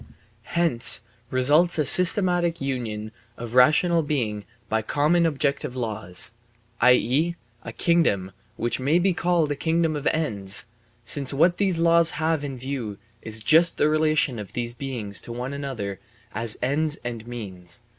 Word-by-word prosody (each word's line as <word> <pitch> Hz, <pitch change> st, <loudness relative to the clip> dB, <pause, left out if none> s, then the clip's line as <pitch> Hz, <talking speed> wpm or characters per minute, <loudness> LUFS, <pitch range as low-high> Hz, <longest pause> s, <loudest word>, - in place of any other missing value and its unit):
Hence 160 Hz, -9 st, +5 dB, 0.3 s
results 150 Hz, +8 st, +3 dB
a 150 Hz, -, +1 dB
systematic 175 Hz, 0 st, +4 dB
union 115 Hz, -6 st, -4 dB, 0.3 s
of 120 Hz, 0 st, -7 dB
rational 155 Hz, +7 st, +4 dB
being 115 Hz, -9 st, -3 dB, 0.2 s
by 110 Hz, +1 st, 0 dB
common 155 Hz, +8 st, +1 dB
objective 140 Hz, -4 st, -2 dB
laws, 110 Hz, -7 st, -2 dB, 0.5 s
i.e., 130 Hz, +7 st, +3 dB, 0.3 s
a -, -, -8 dB
kingdom 110 Hz, -, +1 dB, 0.2 s
which 120 Hz, +3 st, -2 dB
may 140 Hz, +6 st, +2 dB
be 185 Hz, +1 st, +2 dB
called 170 Hz, -3 st, 0 dB
a -, -, -1 dB
kingdom 160 Hz, +1 st, 0 dB
of 145 Hz, -1 st, -3 dB
ends, 105 Hz, -10 st, -1 dB, 0.4 s
since 140 Hz, +2 st, 0 dB
what 170 Hz, +5 st, +3 dB
these 190 Hz, -4 st, 0 dB
laws 170 Hz, 0 st, +4 dB
have 160 Hz, -2 st, 0 dB
in 135 Hz, -2 st, -5 dB
view 125 Hz, -5 st, -5 dB, 0.2 s
is 110 Hz, 0 st, -4 dB
just 165 Hz, +7 st, +3 dB
the 150 Hz, -, +2 dB
relation 155 Hz, -5 st, +1 dB
of 100 Hz, -3 st, -9 dB
these 120 Hz, -1 st, -3 dB
beings 120 Hz, -8 st, -4 dB
to -, -, -9 dB
one 125 Hz, +3 st, -5 dB
another 120 Hz, -9 st, -5 dB, 0.3 s
as 115 Hz, 0 st, -2 dB
ends 150 Hz, +4 st, 0 dB
and 115 Hz, -1 st, -6 dB
means. 95 Hz, -6 st, -9 dB
135 Hz, 145 wpm, -24 LUFS, 115-165 Hz, 0.5 s, Hence